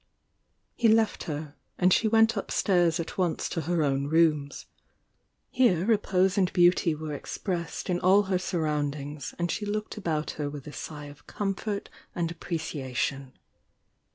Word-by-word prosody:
He 240 - +2
left 220 0 +3
her, 150 -1 -5 0.2
and 180 0 +4
she 225 - +3
went 225 +1 +4
upstairs 175 -4 +1
at 165 - -5
once 175 -3 0
to 165 - -2
her 170 0 0
own 140 -1 0
rooms. 155 -2 +2 0.9
Here 190 -9 +3
repose 200 -3 +2
and 185 -1 +2
beauty 175 -2 +4
were 155 0 -5
expressed 170 +3 -4
m 180 -1 0
all 195 +3 +5
her 190 -2 0
surroundings 150 -4 -3
ant] 175 0 -1
she 210 - -3
looked 215 +1 -3
about 160 -6 -2
her 145 - -1
with 145 -2 -8
a 150 - -9
sigh 150 -2 -7
of 145 0 -13
comfort 200 0 -3 0.3
and 170 -2 -1
appreciation. 140 -5 -4
170 Hz, 150 wpm, -27 LUFS, 150-195 Hz, 0.9 s, all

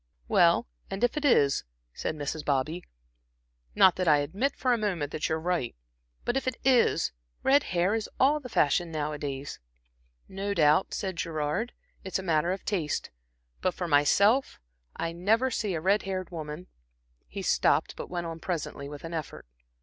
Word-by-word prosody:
"Well, - - +4 0.2
and 195 +4 -4
if 245 - +2
it 300 - -2
is," 145 - +4 0.3
said - - -3
Mrs. 150 +1 -4
Bobby 150 +5 -1 0.9
"not 185 - +6
that 185 -1 -1
I 150 -2 +6
admit 195 - -1
for 255 -1 +1
a - - +2
moment 175 -9 -1
that 155 - -2
you 160 - +1
are - - -3
right 170 -7 -1 0.5
but 240 - 0
if 270 -1 -1
it 255 - 0
is, 245 - +3 0.3
red 280 +2 +4
hair 180 +3 +1
is 220 -1 -2
all 290 +3 +4
the 255 -3 -9
fashion 165 -2 +2
nowadays." 145 -2 -4 0.7
"No 200 +1 -3
doubt," 155 +2 +3
said 190 -3 -3
Gerard. 165 +8 -2 0.3
"It's 190 - -2
a 190 - -5
matter 170 -1 +1
of 190 - -4
taste. 170 -8 -2 0.5
But 185 - 0
for 175 - -3
myself 200 - +3 0.4
I 165 - -2
never 220 +9 +1
see 205 -6 -1
a - - -1
red 195 +4 +3
haired 185 -2 -4
woman" 155 +1 -6 0.6
He - - -6
stopped, - - +2
but - - -7
went 175 -1 -3
on 165 0 -5
presently 160 -5 -4
with 145 -1 -9
an 165 0 -6
effort. 160 - -5
175 Hz, 175 wpm, -28 LUFS, 150-205 Hz, 0.9 s, not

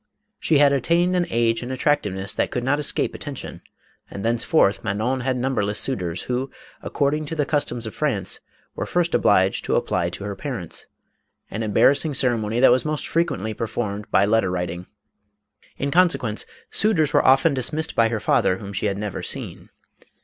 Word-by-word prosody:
She 155 - +2
had 140 -1 +5
attained 170 +7 +2
an 175 -1 +1
age 115 0 +1
and 125 +1 -5
attractiveness 105 -8 0
that - - 0
could 125 - -3
not 140 +3 +1
escape 150 - 0
atten - - -6
tion, - - -8 0.5
and 100 - -6
thenceforth 115 -1 +2
Manon 110 +6 -1
had 130 0 -1
numberless 110 -5 -1
suitors, 90 -10 -1
who, 125 +2 -2 0.3
according 150 +1 -1
to 160 - -4
the 150 -2 0
customs 125 -5 -1
of 110 - -6
France, - - -1 0.3
were - - -4
first 175 -1 0
obliged 95 -1 +3
to - - 0
apply - - 0
to - - -8
her 100 -1 -4
parents; 115 - -6 0.6
an 110 - -4
embarrassing 140 +7 +3
cere 125 -3 +3
mony 110 +1 -2
that 130 - +6
was 125 +1 +3
most 155 -1 -3
frequently 110 - -1
performed 105 -2 -4
by - - +4
letter 110 -2 +2
writing. 90 0 -4 0.9
In 140 +1 -2
consequence, 165 -11 +2 0.2
suitors 180 -9 +1
were - - +4
often 135 +4 +5
dismissed 150 +5 -2
by 115 -2 +4
her 110 -2 -2
father, 95 - +2
whom 100 0 -8
she 100 +2 -1
had 100 -1 -2
never 105 -2 -4
seen. - - -5
120 Hz, 180 wpm, -23 LUFS, 105-145 Hz, 0.9 s, that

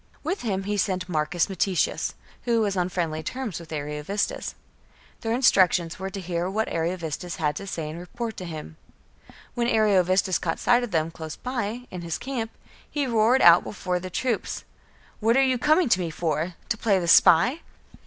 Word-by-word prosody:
With 360 +6 -2
him 195 -5 -1
he 205 +1 -2
sent 185 -1 0
Marcus 165 0 0
Metius, 190 -2 0 0.3
who 235 -2 +2
was 205 -2 0
on 180 -1 0
friendly 165 -4 -2
terms 245 -2 -4
with 165 -2 -12
Ariovistus. 150 +6 -3 0.6
Their 225 - -3
instructions 185 -9 +3
were 190 0 -3
to 195 - -6
hear 175 0 -2
what 215 +3 -1
Ariovistus 170 0 -3
had 150 -2 -1
to 200 - -7
say 165 -5 -4
and 155 +2 -6
report 225 +5 -5
to 185 - -6
him. 160 -1 -8 0.8
When 240 -1 0
Ariovistus 190 -4 +3
caught 165 -2 -2
sight 245 0 +3
of 245 - -3
them, 165 -3 0
close 160 -1 -7
by, 245 -1 -4
in 180 - -6
his 170 -1 -3
camp, 245 -4 -4 0.4
he 290 -2 -1
roared 235 +1 +3
out 170 0 +8
before 180 -3 -3
the 185 +1 -6
troops, 235 +4 -2 0.6
"What 230 +3 +3
are 270 - +5
you 255 -2 +1
coming 310 +5 +4
to 190 - +4
me 175 -2 -2
for? 165 +1 -2
To 230 - 0
play 205 -4 +3
the 175 -2 -2
spy?" 245 - +6
185 Hz, 185 wpm, -25 LUFS, 170-230 Hz, 0.8 s, out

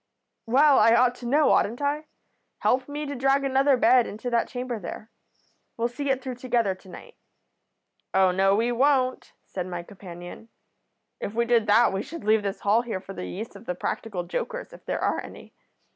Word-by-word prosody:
"'Well, 275 +4 +5
I 230 0 +6
ought 245 +1 +4
to 240 - -7
know, 290 +4 +4
oughtn't 230 +4 +2
I? 290 +2 -1 0.5
Help 255 +2 +1
me 295 +1 -4
to 285 - -4
drag 270 +1 +2
another 270 0 +3
bed 245 0 +4
into 220 +4 -6
that 235 -1 +1
chamber 245 -2 -4
there. 210 +4 -8 0.7
We'll 235 +1 0
see 280 +3 -4
it 265 -1 0
through 255 -2 -5
together 240 -5 0
to 185 0 -17
night.' - - -12 0.9
"'Oh, 190 -1 +4
no, 195 +2 +3
we 230 +3 +1
won't,' 255 0 +1
said 180 -1 -5
my 175 -1 -5
companion. 175 +3 -11 0.7
'If 205 - -5
we 235 0 +2
did 235 -2 +2
that 220 +1 +5
we 195 - -1
should 295 -2 -8
leave 215 +1 +3
this 200 -1 -4
hall 210 +3 +3
here 230 -6 -4
for 195 +1 -10
the 180 - -6
use 220 +5 -7
of 230 - -13
the 180 - -2
practical 185 0 -4
jokers, - - -5
if - - -14
there - - -2
are - - +1
any. - - -12
235 Hz, 195 wpm, -25 LUFS, 200-260 Hz, 0.9 s, I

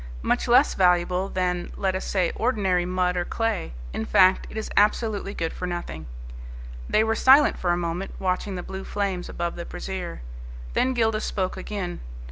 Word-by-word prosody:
Much - - +1
less - - +5
valuable 180 +1 +2
than, 180 -1 -1
let 190 -1 0
us 185 - -3
say, 185 -3 +1
ordinary 195 -7 +1
mud 180 0 0
or 175 - 0
clay. 225 - -2 0.2
In - - -2
fact, 185 +10 +4
it - - -8
is 220 - -4
absolutely 210 -1 +1
good 165 -1 -2
for 180 - -4
nothing." 175 - -5 0.8
They 215 - +4
were 220 0 +1
silent 265 +6 +5
for 180 - -1
a 175 - +3
moment, 175 +2 -3
watching 190 +1 -1
the 180 - -5
blue 190 0 -6
flames 195 -4 -2
above 170 0 -3
the 170 - -5
brazier. 180 - -6 0.5
Then 260 0 +1
Gildas 220 -2 +1
spoke 185 -2 -2
again. 195 -4 -5
185 Hz, 175 wpm, -25 LUFS, 175-205 Hz, 0.8 s, less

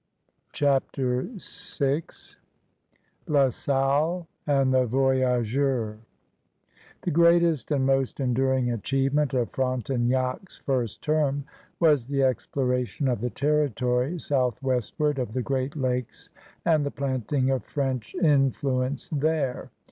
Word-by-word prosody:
CHAPTER 135 -2 0
VI 145 -4 -2 1.3
LA 140 -3 +4
SALLE 140 +7 0 0.2
AND 135 -2 +3
THE 130 -1 +3
VOYAGEUBS 130 -2 +1 1.0
The - - -1
greatest 170 -2 +4
and 140 -3 +1
most 135 0 +1
enduring 130 -1 +1
achievement 135 +4 0
of 120 -2 0
Frontenac's 130 - -1
first 120 -6 -2
term 145 -2 +1 0.3
was 150 -8 +3
the 140 -1 +1
exploration 125 -1 0
of 120 -5 0
the 125 - -1
territory 140 - 0
southwestward 135 +1 0
of 120 -4 -3
the 130 0 -1
Great 135 +2 -2
Lakes 125 -3 -3 0.3
and 155 -3 +3
the 140 - -1
planting 130 -1 -1
of 130 - -1
French 130 -5 -3
influence 135 -3 +1
there. 150 -3 -1
135 Hz, 105 wpm, -26 LUFS, 125-145 Hz, 1.3 s, LA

